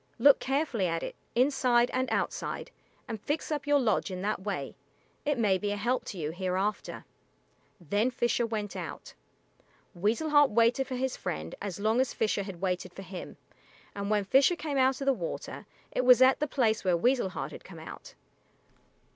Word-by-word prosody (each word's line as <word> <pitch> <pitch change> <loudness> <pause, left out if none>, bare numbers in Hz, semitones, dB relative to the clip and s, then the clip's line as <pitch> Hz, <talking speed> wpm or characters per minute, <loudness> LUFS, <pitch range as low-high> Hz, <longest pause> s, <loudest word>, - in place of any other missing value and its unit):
Look 280 +4 +6
carefully 270 - 0
at 165 -1 -2
it, - - -5 0.2
inside 250 -2 +3
and 260 +1 0
outside, - - -2 0.4
and 220 -3 -5
fix 300 +5 -2
up 295 -1 -2
your 290 0 +5
lodge 220 -7 +1
in 185 0 -5
that 205 -1 -1
way. 190 -9 -4 0.5
It 290 -2 +1
may 200 -5 +2
be 205 - -2
a 205 - -2
help 240 +5 0
to 195 - -6
you 155 -2 -2
hereafter." 185 +4 -2 0.7
Then 205 - +1
Fisher 240 -1 0
went 210 -4 -4
out. 175 -4 -7 0.8
Weasel 220 - 0
Heart 290 -2 +6
waited 235 +4 +3
for 260 - -4
his 260 +1 -1
friend 80 +1 -4
as 200 -2 -4
long 220 +4 +2
as 260 - -2
Fisher 215 -2 +1
had 190 -3 -7
waited 185 -1 -2
for 195 - -9
him, 185 -1 -8 0.6
and 200 0 -4
when 210 -1 +2
Fisher 270 - +4
came 300 -4 -2
out 260 +1 +3
of - - -2
the 275 - +4
water 175 -9 -6 0.2
it 255 - 0
was 250 -1 +7
at 260 +1 +6
the 300 - 0
place 225 -6 +1
where 180 -2 +2
Weasel 245 +1 +2
Heart - - -5
had - - -10
come - - -12
out. - - -10
220 Hz, 190 wpm, -29 LUFS, 190-260 Hz, 0.8 s, was